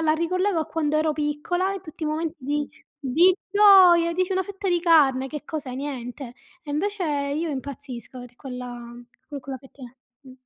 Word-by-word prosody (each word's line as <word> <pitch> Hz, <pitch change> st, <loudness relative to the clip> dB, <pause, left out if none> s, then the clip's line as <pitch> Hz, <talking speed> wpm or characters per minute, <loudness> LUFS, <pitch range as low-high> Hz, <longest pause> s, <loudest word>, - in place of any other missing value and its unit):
la 310 Hz, -1 st, +3 dB
ricollego 360 Hz, +2 st, 0 dB
a -, -, -3 dB
quando 305 Hz, -2 st, -1 dB
ero 310 Hz, 0 st, +2 dB
piccola 305 Hz, +6 st, -1 dB
in 390 Hz, -, -5 dB
tutti 315 Hz, -2 st, -8 dB
i -, -, 0 dB
momenti 320 Hz, +2 st, -2 dB
di 290 Hz, +2 st, -2 dB, 0.3 s
di 315 Hz, +7 st, +4 dB, 0.2 s
gioia, 375 Hz, -5 st, +7 dB
e -, -, -4 dB
dici 370 Hz, +1 st, 0 dB
una 375 Hz, 0 st, +1 dB
fetta 395 Hz, 0 st, -5 dB
di 350 Hz, -1 st, +2 dB
carne 285 Hz, -6 st, +4 dB
che 300 Hz, 0 st, -7 dB
cos'è, 285 Hz, -5 st, -5 dB
niente. 255 Hz, -2 st, -6 dB, 0.3 s
E 290 Hz, -, -8 dB
invece 385 Hz, +5 st, -1 dB, 0.3 s
io 325 Hz, +1 st, -2 dB
impazzisco 260 Hz, -3 st, -7 dB
per 245 Hz, -1 st, -12 dB
quella 250 Hz, -2 st, -7 dB, 0.4 s
per 285 Hz, -2 st, -6 dB
quella 265 Hz, 0 st, -7 dB
fettina, 255 Hz, -1 st, -14 dB, 0.3 s
mh. 260 Hz, -2 st, -13 dB
300 Hz, 185 wpm, -24 LUFS, 265-345 Hz, 0.4 s, gioia